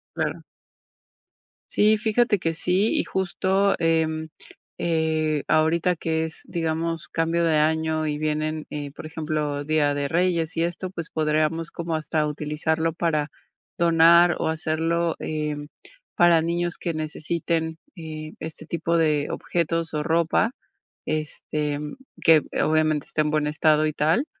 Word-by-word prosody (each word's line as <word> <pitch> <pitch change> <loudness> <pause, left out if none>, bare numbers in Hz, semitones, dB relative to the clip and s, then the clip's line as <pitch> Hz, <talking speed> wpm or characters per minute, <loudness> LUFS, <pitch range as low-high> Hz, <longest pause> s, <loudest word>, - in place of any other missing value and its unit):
Claro. - - -2 1.3
Sí, 215 +1 +5
fíjate 220 0 +2
que 165 -2 -1
sí, 180 +6 +1
y - - +2
justo, 190 +1 +1
em, 160 -1 +1 0.5
eh, 160 -2 0
ahorita 165 +3 +2
que 160 0 -1
es, 160 - -8
digamos, 165 -1 -2
cambio 165 +1 0
de 160 -2 +3
año 160 +1 +1
y 150 -1 -2
vienen, 155 0 -2
eh, 145 -1 -5
por 155 - -9
ejemplo, 150 -2 -2
Día 150 -1 +2
de 145 0 -1
Reyes 170 -1 +1
y 165 - +2
esto, 175 +2 -3
pues 170 -3 -6
podríamos 155 +1 0
como 165 -1 -3
hasta 155 0 -1
utilizarlo 155 +2 -1
para 155 -3 -1 0.5
donar 170 0 +6
o - - 0
hacerlo, 160 +1 0
em, 150 -1 -3 0.5
para 170 -2 +5
niños 170 +1 -1
que 170 - -3
necesiten, 160 +1 -2 0.2
eh, 155 -1 -7
este 160 0 -8
tipo 170 0 0
de 150 -2 +2
objetos 165 -1 -2
o 150 - 0
ropa, 165 +6 +2 0.6
este, 150 -1 -2 0.4
que 160 -2 +6 0.2
obviamente 155 -1 +2
esté 155 - 0
en 150 - -1
buen 150 -1 +1
estado 155 0 +3
y 155 - -2
tal, 160 - +2
160 Hz, 140 wpm, -24 LUFS, 155-170 Hz, 1.3 s, donar